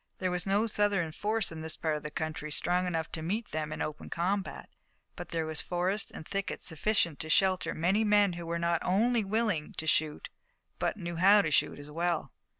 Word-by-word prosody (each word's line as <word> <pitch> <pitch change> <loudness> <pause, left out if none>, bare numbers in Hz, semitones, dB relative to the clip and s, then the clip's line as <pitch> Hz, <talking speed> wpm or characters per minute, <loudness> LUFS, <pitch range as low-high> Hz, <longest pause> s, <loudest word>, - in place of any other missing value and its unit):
There 185 -1 -1
was 180 +1 -2
no 200 +3 +3
Southern 205 -6 +1
force 215 +4 0
in 160 -1 -7
this 160 0 -1
part 160 -2 0
of 150 - -4
the 150 - -5
country 155 0 -4
strong 180 +4 +1
enough 165 -3 -2
to 160 - -4
meet 210 +8 -2
them 155 0 -2
in - - -2
open 155 0 -6
combat, 190 +3 -2 0.5
but - - -7
there 165 -1 -1
was 155 -1 -1
forest 185 +3 -1
and 160 - -9
thicket 195 -1 -3
sufficient 170 -2 +1
to 155 - -4
shelter 185 +3 +3
many 190 +7 +2
men 205 -3 +4
who 170 -1 -6
were 170 0 -1
not 170 0 +1
only 225 +5 +2
willing 205 -6 0
to 160 - -5
shoot, 155 -1 0 0.5
but - - 0
who 195 - -9
knew 170 0 -3
how 200 +4 +6
to 155 - -1
shoot 145 - +2
well. 170 -5 -1
175 Hz, 210 wpm, -30 LUFS, 160-200 Hz, 0.5 s, how